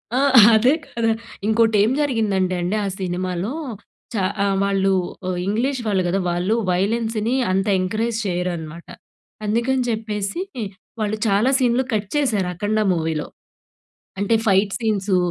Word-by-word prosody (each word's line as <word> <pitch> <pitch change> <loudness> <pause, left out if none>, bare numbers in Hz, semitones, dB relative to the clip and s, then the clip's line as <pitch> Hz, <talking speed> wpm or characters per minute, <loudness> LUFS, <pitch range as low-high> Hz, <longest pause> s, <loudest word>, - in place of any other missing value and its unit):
ఆ! - - +2 0.4
అదే 245 +6 +4
గదా! 230 -1 -1 0.4
ఇంకోటి 225 0 +3
ఏం 225 - +2
జరిగిందంటే 205 -9 0
అండి 180 +4 -1
ఆ - - -1
సినిమాలో, 185 +2 -2 0.6
చా 205 - 0 0.2
ఆహ్, 195 -1 +1
వాళ్ళు 195 -1 +1 0.4
ఆహ్, 180 - -2
ఇంగ్లీష్ 245 +5 0
వాళ్ళు 190 -3 +1
గదా! 190 +3 0
వాళ్ళు 180 +5 0 0.2
వయలెన్స్‌ని 220 +5 0 0.2
అంత 195 +2 0
ఎంకరేజ్ 220 +5 -1
చేయరనమాట. 175 -3 -4 0.6
అందుకని 240 +4 +1
చెప్పేసి 215 - -2 0.6
వాళ్ళు 215 0 -1
చాలా 210 +5 +3
సీన్‌లు 250 +1 +2
కట్ 205 -2 -1
చేసారు 215 -11 +1
'అఖండ' 210 +4 0
మూవీలో. 160 -2 -2 0.9
అంటే 205 +3 +2
ఫైట్ 195 +1 +3
సీన్సు 205 -4 0
205 Hz, 130 wpm, -21 LUFS, 185-225 Hz, 0.9 s, అదే